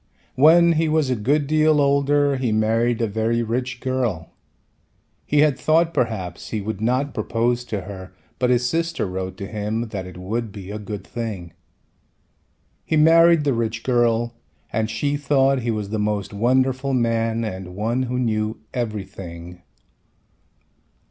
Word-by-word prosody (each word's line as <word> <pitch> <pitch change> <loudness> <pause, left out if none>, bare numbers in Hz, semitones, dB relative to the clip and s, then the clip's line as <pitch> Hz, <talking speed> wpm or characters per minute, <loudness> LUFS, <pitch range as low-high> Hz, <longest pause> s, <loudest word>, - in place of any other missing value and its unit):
When 170 +5 +6
he 160 -1 +1
was 155 -4 +1
a - - +2
good 140 +7 +1
deal 155 +1 +3
older 140 0 +3
he 125 -3 -1
married 115 +2 +1
a - - +1
very 110 +3 0
rich 120 +2 -3
girl. 125 -11 -2 1.0
He 145 0 +3
had 150 -3 +3
thought 165 +1 +2
perhaps 95 -8 -2
he 110 - -2
would 105 0 -5
not 130 +5 0
propose 120 +1 0
to 105 -4 -3
her 95 -1 -9 0.3
but 125 0 +2
his 125 0 +2
sister 165 +1 -1
wrote 95 0 -5
to 100 - -5
him 110 +2 -3
that 95 -4 -5
it 90 - -11
would 110 +5 -3
be 100 -1 -9
a 105 - -5
good 105 -1 -7
thing. 105 -8 -6 1.3
He 160 - 0
married 165 +1 +6
the 140 -2 +1
rich 115 -1 -2
girl 120 -2 +1 0.4
and 110 0 0
she 140 +7 -1
thought 135 -2 +2
he 120 - -2
was 105 -3 -3
the 110 - -1
most 105 -1 -2
wonderful 130 +4 +1
man 115 -1 0
and 95 -4 -6
one 115 +5 -1
who 125 0 -2
knew 110 -3 -1 0.2
everything. 95 -7 -6
115 Hz, 155 wpm, -22 LUFS, 105-135 Hz, 1.3 s, When